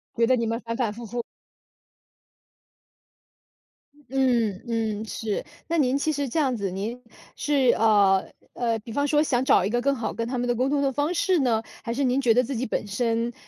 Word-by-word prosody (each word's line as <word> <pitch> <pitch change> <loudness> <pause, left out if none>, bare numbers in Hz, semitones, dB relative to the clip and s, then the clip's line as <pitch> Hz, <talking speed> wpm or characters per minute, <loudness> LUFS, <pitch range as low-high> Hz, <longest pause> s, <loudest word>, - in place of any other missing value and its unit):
觉 230 0 +3
得 255 - +4
你 230 -1 -1
们 230 +1 -1
反 230 0 -4
反 235 -4 0
复 235 +2 -8
复。 240 +2 -4 2.9
嗯 240 -7 +1
嗯， 220 -2 -2
是。 215 -1 -3 0.2
那 335 - 0
您 270 -3 +2
其 310 +2 0
实 285 -2 -2
这 315 - -1
样 265 -5 +1
子， 200 -4 -2
您 215 +7 -4 0.3
是 280 -4 +2
呃 200 -3 +3 0.2
呃， 230 -2 -1
比 220 +2 -10
方 285 +5 0
说 295 +1 +3
想 260 -5 +1
找 185 - +4
一 - - 0
个 240 +2 0
更 280 +2 +1
好 235 -3 -3
跟 230 0 -3
他 255 +1 -3
们 245 0 -1
的 240 - +1
沟 255 +3 +1
通 285 0 +1
的 275 -1 +1
方 290 +5 0
式 365 0 +2
呢？ 235 -5 +1 0.2
还 230 - -3
是 280 +4 -1
您 255 0 +2
觉 240 -4 +4
得 250 +2 +3
自 265 +2 -4
己 245 +3 -2
本 220 - -2
身， 230 +3 -1
240 Hz, 225 characters per minute, -25 LUFS, 225-270 Hz, 2.9 s, 得